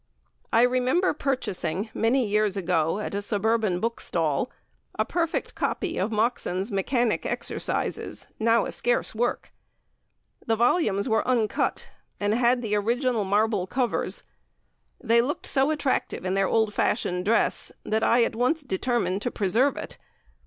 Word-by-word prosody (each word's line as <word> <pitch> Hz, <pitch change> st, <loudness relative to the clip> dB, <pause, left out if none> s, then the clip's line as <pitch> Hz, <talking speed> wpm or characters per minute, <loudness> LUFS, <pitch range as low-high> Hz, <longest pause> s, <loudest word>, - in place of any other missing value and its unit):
I 230 Hz, -, +5 dB
remember 255 Hz, +9 st, +2 dB
purchasing 220 Hz, -, -2 dB
many 240 Hz, +3 st, +2 dB
years 210 Hz, -1 st, +1 dB
ago 170 Hz, -2 st, +1 dB
at 210 Hz, -, -4 dB
a 200 Hz, -, -1 dB
suburban 210 Hz, -2 st, +1 dB
book 230 Hz, +3 st, -2 dB
stall, 160 Hz, -, 0 dB, 0.5 s
a -, -, +1 dB
perfect 335 Hz, -2 st, -2 dB
copy 375 Hz, -, -2 dB
of 195 Hz, +5 st, -1 dB
Moxon's 215 Hz, -3 st, -1 dB
Mechanic 230 Hz, +4 st, 0 dB
Exercises, -, -, -2 dB
now 230 Hz, +1 st, +3 dB
a -, -, -4 dB
scarce 240 Hz, 0 st, 0 dB
work. 240 Hz, +2 st, -2 dB, 0.9 s
The 225 Hz, -, +1 dB
volumes 225 Hz, -, +2 dB
were 220 Hz, 0 st, +1 dB
uncut, 235 Hz, -4 st, 0 dB, 0.3 s
and 205 Hz, +1 st, +1 dB
had 245 Hz, +1 st, +2 dB
the 215 Hz, -2 st, -2 dB
original 230 Hz, +1 st, +1 dB
marble 205 Hz, -1 st, +1 dB
covers. 250 Hz, +3 st, -1 dB, 0.8 s
They 235 Hz, -1 st, +3 dB
looked 275 Hz, +5 st, -3 dB
so 270 Hz, +1 st, +2 dB
attractive 290 Hz, -10 st, -1 dB
in 185 Hz, -, 0 dB
their 195 Hz, 0 st, +2 dB
old 220 Hz, -2 st, +1 dB
fashioned 180 Hz, -5 st, 0 dB
dress, 225 Hz, +2 st, +1 dB
that 220 Hz, +1 st, 0 dB
I 235 Hz, 0 st, +4 dB
at 230 Hz, -, -1 dB
once 255 Hz, +7 st, +1 dB
determined 215 Hz, -3 st, -1 dB
to 245 Hz, -, -1 dB
preserve 235 Hz, +7 st, +1 dB
it. -, -, -7 dB
225 Hz, 145 wpm, -26 LUFS, 200-245 Hz, 0.9 s, I